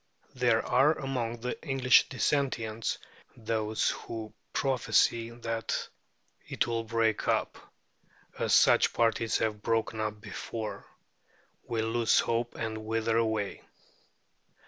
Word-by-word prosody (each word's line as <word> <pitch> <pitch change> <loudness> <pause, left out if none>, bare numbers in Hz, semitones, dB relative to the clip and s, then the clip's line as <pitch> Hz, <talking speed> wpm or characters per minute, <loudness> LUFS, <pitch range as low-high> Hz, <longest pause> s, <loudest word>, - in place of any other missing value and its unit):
There 120 -3 +2
are 135 +5 +4
among 120 -4 -3
the 125 +1 -4
English 135 -4 +4
Dissentients 115 -4 -1 0.4
those 110 -1 0
who 110 -2 -7 0.2
prophesy 115 -3 +2
that 115 -1 -3 0.6
it - - 0
will 115 -1 -2
break 115 -1 0
up, - - +1 0.8
as - - 0
such - - +5
parties 115 -1 +1
have 110 -2 -1
broken 115 0 0
up 105 -1 -2
before 110 +2 -6 0.8
will 110 -1 -1
lose 115 0 +3
hope 115 +1 -1
and 110 -1 -3
wither 115 +1 0
away. 110 -3 -1
115 Hz, 110 wpm, -29 LUFS, 110-120 Hz, 0.8 s, such